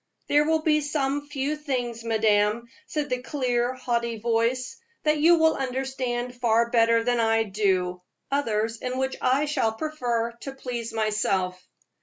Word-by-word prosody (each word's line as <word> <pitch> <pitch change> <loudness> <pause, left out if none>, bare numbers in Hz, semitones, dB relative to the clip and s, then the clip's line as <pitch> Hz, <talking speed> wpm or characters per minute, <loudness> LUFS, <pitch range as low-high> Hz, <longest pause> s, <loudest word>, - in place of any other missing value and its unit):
"There 295 +1 +4
will 320 0 +1
be 305 -1 +3
some 290 -1 -1
few 290 +1 -2
things, 245 -6 -3
madame," 220 0 +2 0.2
said 295 -3 -3
the 250 0 0
clear, 250 -2 -1
haughty 235 -2 -1
voice, 235 +3 0 0.3
"that 300 0 +2
you 335 +3 +6
will 320 0 +4
understand 255 -2 -3
far 235 0 +3
better 230 -1 +4
than 245 0 +1
I 225 0 +3
do, 190 -3 0 0.3
others 230 -5 0
in 250 +2 -4
which 265 0 -1
I 270 +4 +2
shall 230 -7 0
prefer 240 -4 -2
to 270 - -6
please 245 -3 -5
myself." 195 -4 0
245 Hz, 150 wpm, -25 LUFS, 225-275 Hz, 0.3 s, you